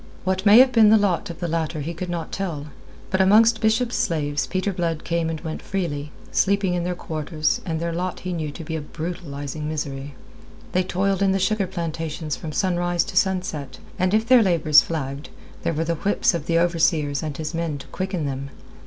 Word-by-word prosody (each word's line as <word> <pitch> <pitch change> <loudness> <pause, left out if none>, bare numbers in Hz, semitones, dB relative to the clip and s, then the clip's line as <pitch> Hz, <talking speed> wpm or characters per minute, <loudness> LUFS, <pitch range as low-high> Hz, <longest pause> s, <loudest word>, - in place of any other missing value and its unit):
What 190 +2 0
may 205 +2 +9
have 255 +1 +7
been 225 -3 +6
the 220 - +7
lot 190 -6 0
of 170 0 -7
the 175 - -2
latter 160 -1 -2
he 165 +4 -4
could 180 +2 -5
not 170 -2 -4
tell, 160 -7 -4 0.4
but 190 0 +3
amongst 220 +4 +5
Bishop's 230 +2 +2
slaves 155 -10 0
Peter 190 +1 -1
Blood 165 -3 -2
came 170 -1 -1
and 160 -1 -3
went 160 -2 -5
freely, 150 -6 -3 0.2
sleeping 200 -2 +2
in 175 -1 -1
their 180 0 -2
quarters, 155 -2 -2
and 160 -1 -1
their 170 0 -2
lot 180 +2 -3
he 185 -1 -3
knew 160 -3 -3
to 145 +3 -8
be 160 +1 -4
a 160 - -3
brutalizing 150 -2 -5
misery. 140 -2 -4 0.6
They 185 - +2
toiled 190 +1 0
in 195 -1 +3
the - - +2
sugar 195 +1 +1
plantations 165 -3 -4
from 160 - -6
sunrise 175 0 +1
to - - -8
sunset, 185 - 0 0.2
and 185 0 +2
if 220 +1 +1
their 250 -1 +7
labours 165 -6 +5
flagged, 140 -3 -4 0.3
there - - 0
were 160 +1 -1
the 170 - 0
whips 195 +5 +1
of 170 -3 -4
the 165 - +2
overseer 165 -3 +2
and 150 -3 -4
his 155 +1 -4
men 165 -3 -2
to 140 - -10
quicken 185 -4 -3
them. 140 0 -4
170 Hz, 205 wpm, -23 LUFS, 155-190 Hz, 0.6 s, may